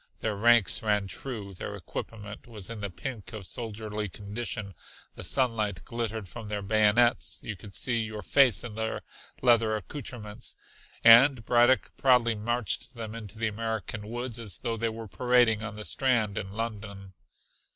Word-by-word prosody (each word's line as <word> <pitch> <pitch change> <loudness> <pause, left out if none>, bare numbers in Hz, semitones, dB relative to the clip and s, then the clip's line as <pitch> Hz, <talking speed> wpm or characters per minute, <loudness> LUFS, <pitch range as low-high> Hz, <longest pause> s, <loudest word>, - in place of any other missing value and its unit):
Their 110 -2 -2
ranks 115 0 +4
ran 105 -2 +1
true, 105 -1 -5
their 90 - -6
equipment 105 -1 -7
was 105 -4 -5
in 110 -2 -6
the 100 - -2
pink 115 +4 -7
of 105 -3 -7
soldierly 110 -1 -4
condition; 105 +1 -5 0.4
the - - -7
sunlight 110 - +1
glittered 115 -3 -3
from 110 +5 -9
their 105 -1 -3
bayonets, 110 +3 +3
you 110 - -4
could 100 +1 -12
see 120 -2 +1
your 110 -2 -5
face 130 +1 +5
in 120 -3 -6
their 110 +1 -3 0.4
leather 115 -3 +5
accouterments, 110 -1 -6 0.5
and 115 +1 +8
Braddock 120 +2 +3
proudly 125 -3 +4
marched 115 +2 -1
them 110 -2 -6
into 110 -2 -9
the 115 0 0
American 110 -1 -4
woods 120 +1 -4
as 105 -7 -5
though 115 -3 -2
they 115 +1 -1
were 110 0 -7
parading 120 -1 +3
on 110 -1 -5
the 105 0 -6
Strand 110 +1 +1
in 100 -3 -4
London. 100 -3 -6
110 Hz, 160 wpm, -28 LUFS, 105-120 Hz, 0.5 s, and